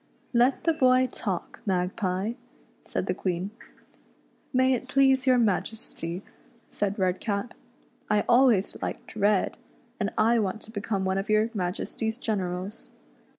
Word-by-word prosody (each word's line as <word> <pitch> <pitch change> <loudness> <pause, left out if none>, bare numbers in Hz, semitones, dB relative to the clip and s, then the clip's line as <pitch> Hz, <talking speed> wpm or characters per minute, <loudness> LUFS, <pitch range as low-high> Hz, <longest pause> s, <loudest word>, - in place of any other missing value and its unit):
" - - -34
Let 260 +2 +1
the 330 - +3
boy 255 -3 +4
talk, 190 -5 -4
Magpie," 185 +2 -1 0.5
said - - -3
the - - 0
Queen. 185 +1 -2 0.5
" - - -36
May 260 0 +4
it 255 +1 -2
please 270 0 +3
your 255 -1 +6
Majesty," 200 -4 -1 0.5
said 205 0 -1
Redcap, 200 +4 -1 0.3
" - - -34 0.2
I 210 -1 +4
always 240 -5 +4
liked - - -5
red, 205 -2 +2 0.4
and 205 -1 0
I 230 +2 +4
want 210 +1 -1
to 220 - -13
become 200 -2 -2
one 190 +1 +1
of 195 - -5
your 215 +2 +3
Majesty's 215 +3 -2
generals." 190 -4 -3
210 Hz, 145 wpm, -27 LUFS, 190-240 Hz, 0.5 s, your